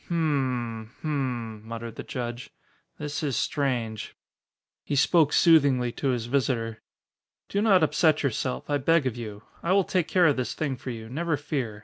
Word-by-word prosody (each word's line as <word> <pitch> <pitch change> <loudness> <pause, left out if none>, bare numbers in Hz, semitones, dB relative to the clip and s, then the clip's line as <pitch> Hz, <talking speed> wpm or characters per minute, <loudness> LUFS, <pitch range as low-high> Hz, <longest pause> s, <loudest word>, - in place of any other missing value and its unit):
"Hm 130 -9 -1
m - - -24
hm - - -7
m," 120 -7 -2
muttered 115 0 -6
the - - -5
judge, 120 -1 -5 0.5
"this 150 0 -4
is 140 -5 -1
strange." 120 -7 -1 0.7
He 145 - -2
spoke 150 +2 +4
soothingly 140 -7 +4
to 140 - -3
his 120 -3 0
visitor. 120 -3 -1 0.7
"Do 200 - 0
not 195 -6 +5
upset 155 -1 +3
yourself, 130 -1 -2
I 145 -1 +1
beg 165 +2 +3
of 125 -3 -1
you. 105 -3 -7 0.2
I 175 - +1
will 195 0 +4
take 180 -2 0
care 180 -2 +4
of 145 -4 +4
this 125 - -2
thing 145 -4 -1
for 130 - -8
you, 115 -2 -6
never 155 +5 -1
fear. 130 -7 -3
135 Hz, 175 wpm, -26 LUFS, 120-155 Hz, 0.7 s, not